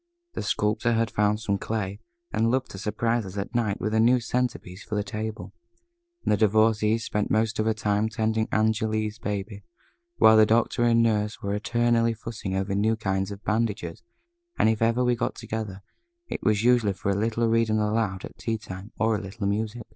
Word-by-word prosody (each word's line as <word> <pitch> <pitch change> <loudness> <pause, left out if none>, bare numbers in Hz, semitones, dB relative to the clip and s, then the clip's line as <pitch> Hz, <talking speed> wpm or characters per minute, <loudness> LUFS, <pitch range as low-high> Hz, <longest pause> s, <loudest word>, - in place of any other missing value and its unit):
The - - -3
Sculptor 105 +3 0
had 115 -1 +1
found 105 0 +1
some 100 -3 -1
clay, 105 -2 -3 0.3
and 110 +1 +2
loved 130 +1 0
to 95 - -8
surprise 115 +3 0
us 95 0 -8
at 100 +4 -4
night 110 -4 0
with 110 - -2
a 110 - +3
new 120 +3 +5
centre 125 +1 -1
piece 90 +2 -12
for 105 - -5
the 105 - 0
table, 110 +1 -5 0.7
and - - +2
the 105 - +3
Divorcée 110 +1 +3
spent 105 -2 -2
most 110 0 +1
of 110 - +1
her 110 - +2
time 105 0 0
tending 110 0 0
Angéle's 110 0 0
baby, 105 -1 -4 0.5
while 110 - +6
the 110 -1 +6
Doctor 115 +2 +2
and 115 0 +4
the - - +4
Nurse 105 0 -2
were 100 0 -1
eternally 115 +2 +1
fussing 110 -4 -5
over 95 +1 -1
new 110 +3 +2
kinds 95 -3 -1
of 100 0 -8
bandages 105 -3 -1 0.6
and - - +4
if 110 -1 0
ever 115 +2 +2
we 125 0 +2
got - - -2
together, 110 -4 -5 0.4
it - - -5
was 105 0 +2
usually 120 -4 +4
for 95 +1 -2
a - - 0
little 115 +3 0
reading 115 -1 +2
aloud 105 -3 0
at - - -13
tea 115 -1 -1
time, 100 -1 -9
or 110 0 +2
a 105 - -3
little 100 +2 -6
music. 110 +3 -2
110 Hz, 200 wpm, -26 LUFS, 105-115 Hz, 0.7 s, while